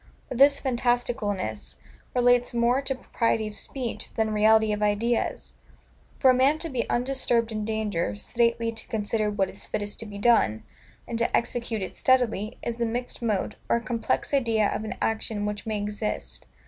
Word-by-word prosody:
But 255 - -4
this 280 +1 +6
fantasticalness 235 - -1 0.4
relates 245 -1 +3
more 240 +3 +3
to 270 -1 -1
propriety 230 -3 0
of 210 - -8
speech, 250 +3 -5
than 220 -1 0
reality 220 0 +4
of 210 - -3
ideas. 210 +3 0 0.6
For 260 - +6
a - - +3
man 265 +4 +4
to 330 +1 -4
be 250 -5 -2
undisturbed 240 -2 +1
in 215 -1 -3
danger, 210 - -1
sedately 230 - 0
to 225 0 -8
consider 215 0 0
what 200 -2 0
is - - -11
fittest 205 0 -3
to 225 - -6
be 205 -1 -8
done, 200 - +3 0.4
and 230 - -3
to 235 - +2
execute 235 -3 -2
it 185 - -6
steadily, 240 -4 +1
is 235 0 -3
a - - +3
mixed 245 +2 -4
mode, 215 -2 -1
or - - +4
a - - +1
complex 230 +4 -1
idea 225 -6 +2
of - - -3
an 220 - -4
action 220 -1 -1
which 210 +1 -4
may 215 -1 -1
exist. 210 +1 -4
225 Hz, 175 wpm, -26 LUFS, 210-245 Hz, 0.6 s, this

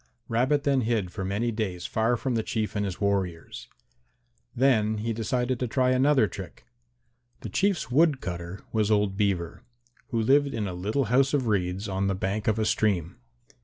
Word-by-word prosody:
Rabbit 130 +5 +1
then 140 -3 +2
hid 110 -6 -1
for 95 0 -4
some 115 +4 -1
days 95 -5 -3
far 115 +2 +1
from 130 +2 -2
the 115 - +1
Chief 110 -1 -3
and 105 0 0
his 95 -2 -5
warriors. 95 -5 -2 0.9
Then 115 -4 +2
he 115 +2 -2
decided 125 +3 -1
to 125 - -1
try 130 +2 +2
another 130 -1 +4
trick. 95 0 -9 0.8
The - - -6
Chief's 195 -8 0
wood 150 0 +4
cutter 85 0 -6
was 110 -2 +1
old 105 -2 +2
Beaver, 95 -5 -1 0.5
who 115 - -1
lived 140 +4 +3
in 105 -3 -2
a 90 - -4
little 105 +10 -1
house 135 +2 +4
of 135 -3 0
reeds 95 -1 -1
on 95 0 -1
the 95 - 0
bank 95 +3 -2
of 110 0 +2
a 110 - +1
stream. 95 -6 0
110 Hz, 180 wpm, -27 LUFS, 95-125 Hz, 0.9 s, another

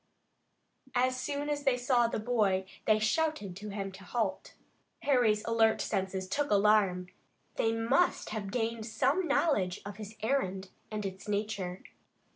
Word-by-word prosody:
As 255 +1 +3
soon 285 +3 -3
as 290 -1 -1
they 270 -3 +3
saw 245 -1 +3
the - - -2
boy 210 -5 +1 0.2
they 215 - +5
shouted 215 - 0
to 210 +1 -7
him 195 -1 -4
to 190 0 -12
halt. 225 +5 -2 0.5
Harry's 235 -6 +3
alert 225 -1 +3
senses 190 0 -2
took 285 +9 -1
alarm. 200 -3 +3 0.5
They 225 - +2
must 225 +10 +1
have 210 -2 -3
gained 225 0 -2
some 275 +10 +1
knowledge 205 - +1
of 205 -1 -7
his 215 0 -8
errand 195 -7 -1 0.2
and 215 -1 -4
its 190 +2 -6
nature. 200 -3 -2
215 Hz, 145 wpm, -31 LUFS, 195-250 Hz, 0.5 s, they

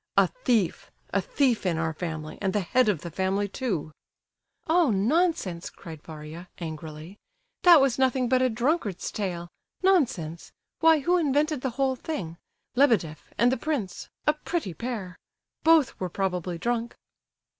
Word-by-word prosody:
A - - +7 0.2
thief! 215 -9 +1 0.2
A 200 - +3
thief 250 +4 +1
in 175 -4 0
our 160 0 -1
family, 155 -2 -5
and 190 -2 0
the 210 - +2
head 230 +6 +2
of 180 -8 0
the 170 - -7
family, 190 +4 0
too!" 195 - -3 0.7
"Oh! 330 -2 +3
nonsense!" 215 - +1
cried 160 -3 -11
Varia, 160 +3 -9
angrily. 160 +2 -7 0.4
"That 345 -3 +8
was 265 -2 +2
nothing 260 -1 +2
but 255 +1 +3
a 255 - +3
drunkard's 235 - -1
tale. 175 -4 -3 0.4
Nonsense! 230 - +1 0.3
Why, 320 -2 +5
who 355 +6 +3
invented 300 -1 +1
the 265 - -1
whole 270 -1 +2
thing—Lebedeff 220 - -1
and 240 +2 +4
the 260 - 0
prince—a 285 +1 -2
pretty 305 - -3
pair! 215 -5 -5 0.4
Both 320 -5 +4
were 185 - -2
probably 180 -1 -2
drunk." 235 +4 -2
215 Hz, 145 wpm, -27 LUFS, 170-270 Hz, 0.7 s, That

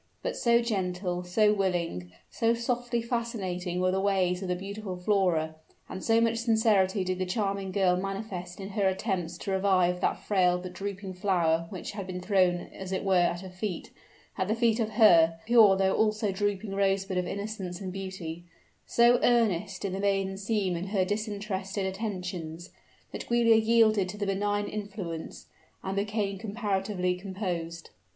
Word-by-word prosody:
But - - -2
so 235 0 +3
gentle, 180 -4 -2
so 210 +4 +3
willing, 175 - -1 0.2
so 230 0 +2
softly 240 0 -1
fascinating 195 -7 -3
were 185 0 +2
the 190 - 0
ways 185 -2 +1
of 190 - -4
the 180 - 0
beautiful 195 0 -6
Flora, 180 -5 +1 0.3
and 190 - -7
so 225 0 +4
much 230 0 +2
sincerity 220 -4 +2
did 185 0 -2
the 185 - 0
charming 195 -1 -1
girl 185 -2 +3
manifest 190 -2 -5
in 195 0 -6
her 200 -1 +1
attempts 185 -3 -2
to 195 - -5
revive 185 -2 +2
that - - +1
frail 180 -3 +2
but 180 0 -7
drooping 195 0 -5
flower 170 -4 +1
which 185 - -6
had 200 -2 -6
been 180 -1 -4
thrown 180 -2 +2
as 190 -1 -7
it 190 - -1
were 195 -1 +1
at 175 0 +1
her 190 -1 -9
feet; 185 -1 -5 0.5
at 185 - 0
the 215 - +1
feet 230 -1 +2
of 220 -2 0
her, 165 -7 +6
a - - -25
pure 220 -4 +6
though 190 0 +2
also 215 -1 +1
drooping 205 +1 -2
rosebud 195 -1 +1
of 180 - -2
innocence 200 -3 -5
and 190 -2 -5
beauty: 185 -4 -6 0.4
so 240 +1 +5
earnest 210 -6 +2
did 195 -2 -2
the 190 - -3
maiden 195 -1 0
seem 195 -2 -1
in 175 +3 -4
her 195 -2 +1
disinterested 205 -1 -3
attentions, 180 -4 -5 0.4
that - - -6
Giulia 235 -1 +4
yielded 220 -3 +3
to 205 - -7
the 205 - -2
benign 205 +1 0
influence, 200 -6 -6 0.4
and 190 0 -3
became 200 -1 -1
comparatively 200 -3 -1
composed. 180 -3 -5
195 Hz, 170 wpm, -28 LUFS, 180-210 Hz, 0.5 s, her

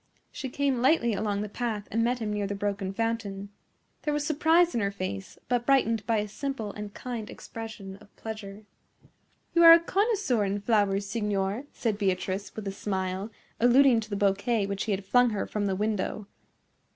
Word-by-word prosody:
She 265 - -5
came 275 -2 0
lightly 250 -4 +3
along 205 0 -1
the - - -4
path 215 -1 -3
and 230 +2 +1
met 245 +2 +1
him 215 -3 -3
near 205 -1 -1
the 200 - -3
broken 200 -1 -2
fountain. 205 -2 -3 0.5
There 300 -1 -1
was 295 0 -1
surprise 325 +3 +3
in 235 - 0
her 200 - +1
face, 185 - -5
but 245 -1 0
brightened 230 -6 +2
by 225 -1 +2
a 210 0 -1
simple 225 -2 -4
and 210 -1 -7
kind 235 -1 -6
expression 220 -4 -8
of 205 - -20
pleasure. 215 -2 -8 0.9
"You 340 - +4
are 330 0 +12
a 335 - +8
connoisseur 385 - +1
in 200 +1 -1
flowers, 200 -2 +2
signor," 205 +2 -1
said 215 -3 -2
Beatrice, 190 0 -1
with 215 -2 -6
a - - -1
smile, 190 0 -3 0.3
alluding 245 +1 +6
to 215 -1 -7
the 205 - -2
bouquet 200 +2 +1
which 200 0 -3
he 220 - -1
had 195 0 -2
flung 245 +4 +4
her 210 -3 -2
from 205 -1 -2
the 190 - 0
window. 210 0 -2
210 Hz, 190 wpm, -28 LUFS, 200-245 Hz, 0.9 s, are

